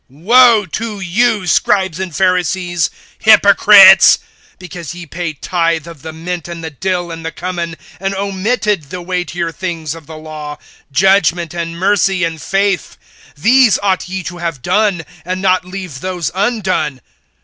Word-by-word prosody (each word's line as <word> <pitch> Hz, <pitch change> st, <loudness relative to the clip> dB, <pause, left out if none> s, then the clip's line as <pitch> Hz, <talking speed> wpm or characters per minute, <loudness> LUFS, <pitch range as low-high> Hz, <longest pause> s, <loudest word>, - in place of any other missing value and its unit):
(23)Woe 220 Hz, -, +4 dB
to 220 Hz, -2 st, -4 dB
you, 205 Hz, +3 st, 0 dB
scribes 190 Hz, -1 st, +1 dB
and 185 Hz, -4 st, -5 dB
Pharisees, 180 Hz, -2 st, 0 dB, 0.3 s
hypocrites! -, -, +7 dB, 0.4 s
because 175 Hz, -4 st, -9 dB
ye 175 Hz, -1 st, -9 dB
pay 170 Hz, +1 st, -5 dB
tithe 165 Hz, +1 st, -1 dB
of 165 Hz, -4 st, -12 dB
the 160 Hz, -, -7 dB
mint 170 Hz, +1 st, -6 dB
and 170 Hz, -1 st, -8 dB
the 160 Hz, -, -5 dB
dill 175 Hz, +2 st, -3 dB
and 165 Hz, 0 st, -8 dB
the 165 Hz, -, -4 dB
cumin, 170 Hz, -2 st, -5 dB, 0.2 s
and 195 Hz, +1 st, -3 dB
omitted 200 Hz, -1 st, -1 dB
the 180 Hz, -, -6 dB
weightier 180 Hz, -1 st, -3 dB
things 165 Hz, -4 st, -5 dB
of 165 Hz, -2 st, -13 dB
the 160 Hz, -1 st, -9 dB
law, 155 Hz, -1 st, -8 dB, 0.3 s
judgment, 175 Hz, 0 st, +2 dB
and 170 Hz, -1 st, -5 dB
mercy, 195 Hz, 0 st, +1 dB
and 165 Hz, -2 st, -3 dB
faith; 195 Hz, +2 st, -1 dB, 0.4 s
these 240 Hz, -, +4 dB
ought 190 Hz, -2 st, 0 dB
ye 190 Hz, 0 st, -4 dB
to 175 Hz, -1 st, -7 dB
have 165 Hz, -7 st, -4 dB
done, 200 Hz, -, 0 dB, 0.2 s
and 185 Hz, +2 st, -4 dB
not 185 Hz, -1 st, +1 dB
leave 180 Hz, -7 st, -7 dB
those 180 Hz, -2 st, -3 dB
undone. 185 Hz, -, -1 dB
180 Hz, 150 wpm, -15 LUFS, 165-195 Hz, 0.4 s, hypocrites